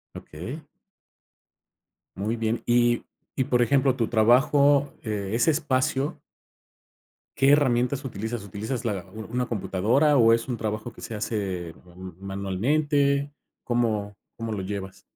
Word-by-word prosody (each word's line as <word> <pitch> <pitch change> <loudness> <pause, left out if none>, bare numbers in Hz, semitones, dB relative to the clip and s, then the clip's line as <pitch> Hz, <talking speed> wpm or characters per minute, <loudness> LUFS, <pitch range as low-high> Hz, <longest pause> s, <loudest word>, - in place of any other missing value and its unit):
Okey. 115 - -7 1.6
Muy 105 +4 -1
bien. 115 0 -1
Y 120 0 +3 0.3
y 130 - +1
por 125 -2 +3
ejemplo, 135 0 +3
tu 115 -3 0
trabajo, 140 +5 +4
eh, 105 -2 -3
ese 120 +7 +3
espacio 140 -2 0 1.2
¿qué 135 +1 +5
herramientas 135 -1 +2
utilizas?, 110 -1 -4
¿utilizas, 110 +5 -5
la 100 -5 -2
una 115 +4 -3
computadora, 115 +8 +2
o 115 -1 +6
es 115 0 0
un 125 -2 -2
trabajo 110 +1 -4
que - - -14
se 115 - -6
hace 95 -6 -3
ma 90 -1 -18 0.4
manualmente? 140 +8 +1 0.3
¿Cómo 110 -4 -1 0.2
cómo 115 -1 -4
lo 105 -2 -2
llevas? 95 0 -6
120 Hz, 125 wpm, -25 LUFS, 105-135 Hz, 1.6 s, o